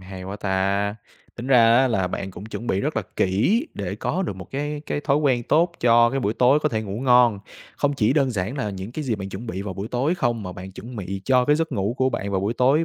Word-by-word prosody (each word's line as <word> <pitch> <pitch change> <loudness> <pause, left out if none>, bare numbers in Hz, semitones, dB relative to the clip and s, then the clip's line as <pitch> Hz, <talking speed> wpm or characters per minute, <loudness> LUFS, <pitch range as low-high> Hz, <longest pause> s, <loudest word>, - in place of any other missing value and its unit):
hay 95 0 -9
quá 95 +2 -6
ta! 100 +1 0 0.4
Tính 120 +2 -6
ra 115 -3 +6
á 130 0 +4
là 95 -5 0
bạn 95 +1 -4
cũng 90 +2 -10
chuẩn 115 +1 -7
bị 95 - 0
rất - - -2
là - - +1
kỹ 150 - +2
để 95 -1 -4
có 175 - -2
được 130 - -4
một 95 -2 -10
cái 145 +2 -3
cái - - -2
thói 145 -1 +1
quen 135 -5 +2
tốt 170 +7 +2
cho 120 0 +5
cái 135 0 -1
buổi 105 -1 -1
tối 130 +4 +4
có 150 - +1
thể 110 -3 -2
ngủ 100 +2 -5
ngon. 125 -5 +4 0.4
Không 145 0 +1
chỉ 110 -2 +2
đơn 140 -3 +2
giản 110 +4 -3
là 105 -6 -2
những 95 +4 -7
cái 155 +1 -4
gì 120 - 0
bạn 95 -2 -6
chuẩn 105 +5 -7
bị 95 -2 -4
vào 100 -3 -5
buổi 100 +4 -5
tối 135 +7 0
không, 120 - -1
mà 90 -1 -6
bạn 95 +1 -9
chuẩn 120 +5 -9
bị 95 -1 -5
cho 130 -1 +3
cái 150 +3 +3
giấc 160 -2 -2
ngủ 105 0 -1
của 130 0 +2
bạn 100 -4 -3
vào 95 -1 0
buổi 105 +4 -1
tối 140 +7 +3
115 Hz, 275 wpm, -23 LUFS, 100-135 Hz, 0.4 s, ra